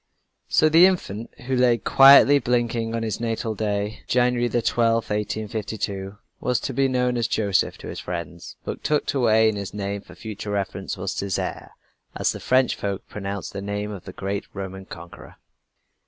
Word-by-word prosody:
So 155 Hz, -, +4 dB
the 165 Hz, +4 st, +7 dB
infant 115 Hz, -, -3 dB
who 130 Hz, +1 st, -2 dB
lay 125 Hz, -1 st, +4 dB
quietly 140 Hz, +4 st, +7 dB
blinking 120 Hz, -2 st, 0 dB
on 115 Hz, -, -2 dB
his 110 Hz, -2 st, -3 dB
natal 115 Hz, -1 st, -2 dB
day, 105 Hz, 0 st, -2 dB
January 125 Hz, -1 st, +2 dB
12, 115 Hz, -1 st, +2 dB
1852, 105 Hz, -2 st, -3 dB, 0.2 s
was 125 Hz, -1 st, 0 dB
to 135 Hz, -, -3 dB
be 135 Hz, +2 st, +2 dB
known 125 Hz, -1 st, 0 dB
as 115 Hz, -2 st, 0 dB
Joseph 100 Hz, -4 st, 0 dB
to -, -, -10 dB
his -, -, -6 dB
friends; 85 Hz, -1 st, -6 dB
but -, -, -5 dB
tucked 150 Hz, -1 st, 0 dB
away 110 Hz, -4 st, +4 dB
in 110 Hz, -1 st, 0 dB
his 100 Hz, 0 st, -6 dB
name 100 Hz, 0 st, -3 dB
for -, -, -15 dB
future 105 Hz, -1 st, -7 dB
reference 100 Hz, -1 st, -3 dB
was 95 Hz, +1 st, -3 dB
Césaire 100 Hz, -2 st, -3 dB, 0.5 s
as -, -, +1 dB
the -, -, -7 dB
French 130 Hz, -1 st, +2 dB
folk 100 Hz, -1 st, -4 dB
pronounced 100 Hz, -1 st, -5 dB
the 100 Hz, -, -5 dB
name 105 Hz, +1 st, -3 dB
of 95 Hz, -4 st, -8 dB
the 95 Hz, -, -8 dB
great 100 Hz, +1 st, -3 dB
Roman 95 Hz, -1 st, -6 dB
conqueror. 85 Hz, 0 st, -11 dB
110 Hz, 170 wpm, -24 LUFS, 100-120 Hz, 0.5 s, the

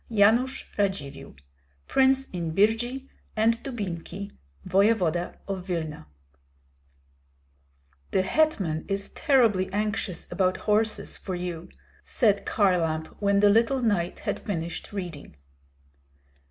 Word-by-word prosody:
Yanush 235 Hz, +5 st, +3 dB, 0.2 s
Radzivill, 190 Hz, -9 st, -2 dB, 0.5 s
Prince 265 Hz, 0 st, +3 dB
in 170 Hz, -3 st, -3 dB
Birji 240 Hz, +6 st, +1 dB, 0.3 s
and 230 Hz, +1 st, +2 dB
Dubinki, 200 Hz, -5 st, -5 dB, 0.4 s
Voevoda 185 Hz, -4 st, +2 dB
of 190 Hz, -2 st, -4 dB
Vilna. 160 Hz, -, -4 dB, 2.0 s
"The 190 Hz, -, +2 dB
hetman 190 Hz, -, +1 dB
is 195 Hz, 0 st, -2 dB
terribly 225 Hz, -11 st, +3 dB
anxious 210 Hz, -2 st, -2 dB
about 185 Hz, -1 st, +1 dB
horses 215 Hz, -1 st, +1 dB
for 185 Hz, -, -5 dB
you," 175 Hz, -2 st, -5 dB, 0.3 s
said 205 Hz, -5 st, +1 dB
Kharlamp, 165 Hz, -6 st, +1 dB
when 200 Hz, -1 st, +3 dB
the 205 Hz, -, +6 dB
little 235 Hz, +4 st, +3 dB
knight 190 Hz, -6 st, 0 dB
had -, -, -2 dB
finished 170 Hz, -4 st, -4 dB
reading. 175 Hz, -, -6 dB
200 Hz, 100 wpm, -26 LUFS, 175-225 Hz, 2.0 s, the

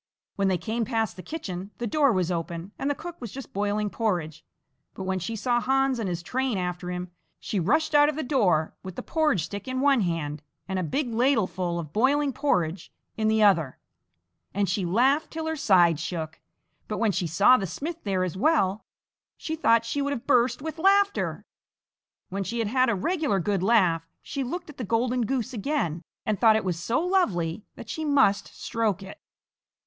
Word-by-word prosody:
When 200 Hz, -1 st, +1 dB
they 185 Hz, -1 st, +2 dB
came 220 Hz, +7 st, -2 dB
past 225 Hz, -5 st, -1 dB
the 185 Hz, -, -8 dB
kitchen, 190 Hz, -, -6 dB
the 240 Hz, -, -3 dB
door 280 Hz, +4 st, +3 dB
was 185 Hz, -4 st, 0 dB
open 170 Hz, +2 st, -4 dB
and 275 Hz, -, -1 dB
the 285 Hz, -, 0 dB
cook 345 Hz, 0 st, -9 dB
was 235 Hz, -5 st, -6 dB
just 270 Hz, 0 st, -9 dB
boiling 205 Hz, +1 st, -1 dB
porridge, 175 Hz, -9 st, -2 dB, 0.5 s
but 190 Hz, -, -5 dB
when 190 Hz, 0 st, -1 dB
she 225 Hz, +6 st, -4 dB
saw 240 Hz, +3 st, +1 dB
Hans 270 Hz, 0 st, +1 dB
and 210 Hz, -4 st, -2 dB
his 175 Hz, -1 st, -4 dB
train 255 Hz, +3 st, -1 dB
after 180 Hz, -1 st, -3 dB
him, 180 Hz, 0 st, -5 dB, 0.3 s
she 205 Hz, -, -2 dB
rushed 305 Hz, -, +1 dB
out 295 Hz, 0 st, +6 dB
of 305 Hz, -, -3 dB
the 315 Hz, -, -2 dB
door 195 Hz, -, +2 dB
with 185 Hz, -2 st, -8 dB
the -, -, -6 dB
porridge 305 Hz, -, +1 dB
stick 200 Hz, +6 st, -6 dB
in 255 Hz, 0 st, -2 dB
one 275 Hz, -3 st, +4 dB
hand 155 Hz, -5 st, -2 dB, 0.3 s
and 190 Hz, -1 st, -2 dB
a -, -, -1 dB
big 240 Hz, -, -2 dB
ladle 240 Hz, -2 st, +3 dB
full 180 Hz, -2 st, -3 dB
of 160 Hz, -3 st, -6 dB
boiling 275 Hz, +4 st, +2 dB
porridge 175 Hz, -, -1 dB, 0.2 s
in 220 Hz, -1 st, 0 dB
the 220 Hz, 0 st, +3 dB
other, 165 Hz, -10 st, +3 dB, 0.8 s
and 200 Hz, 0 st, +1 dB
she 185 Hz, 0 st, -1 dB
laughed 265 Hz, -, +2 dB
till 320 Hz, 0 st, -5 dB
her 320 Hz, 0 st, -1 dB
sides 175 Hz, -, +4 dB
shook; 160 Hz, -2 st, -5 dB, 0.5 s
but 210 Hz, -, -3 dB
when 220 Hz, -2 st, +2 dB
she 180 Hz, -2 st, -1 dB
saw 200 Hz, +10 st, +5 dB
the 195 Hz, -6 st, -1 dB
smith 330 Hz, -, -5 dB
there 190 Hz, -3 st, 0 dB
as 185 Hz, -1 st, -3 dB
well, 210 Hz, -, +2 dB, 0.5 s
she 320 Hz, -, -4 dB
thought 230 Hz, -7 st, +3 dB
she 285 Hz, +5 st, -1 dB
would 285 Hz, 0 st, 0 dB
have 255 Hz, -2 st, -6 dB
burst 255 Hz, 0 st, +2 dB
with 320 Hz, 0 st, -5 dB
laughter. 400 Hz, +3 st, +2 dB, 0.8 s
When 195 Hz, +1 st, -2 dB
she 230 Hz, +6 st, -4 dB
had 225 Hz, -3 st, 0 dB
had 255 Hz, +2 st, +3 dB
a 230 Hz, -, +2 dB
regular 300 Hz, -, 0 dB
good 195 Hz, +1 st, 0 dB
laugh, 180 Hz, -6 st, +3 dB, 0.2 s
she 275 Hz, -, -3 dB
looked 325 Hz, +5 st, -5 dB
at -, -, -20 dB
the 255 Hz, -, -4 dB
golden 235 Hz, +2 st, 0 dB
goose 260 Hz, -1 st, -2 dB
again 205 Hz, -, -1 dB, 0.2 s
and 215 Hz, -3 st, 0 dB
thought 220 Hz, -2 st, +6 dB
it 220 Hz, -, 0 dB
was 175 Hz, -3 st, -1 dB
so 230 Hz, -, 0 dB
lovely 215 Hz, -, 0 dB
that -, -, -10 dB
she 315 Hz, -, -4 dB
must 275 Hz, -9 st, +3 dB
stroke 215 Hz, -4 st, -1 dB
it. 195 Hz, -, -11 dB
215 Hz, 205 wpm, -26 LUFS, 185-270 Hz, 0.8 s, out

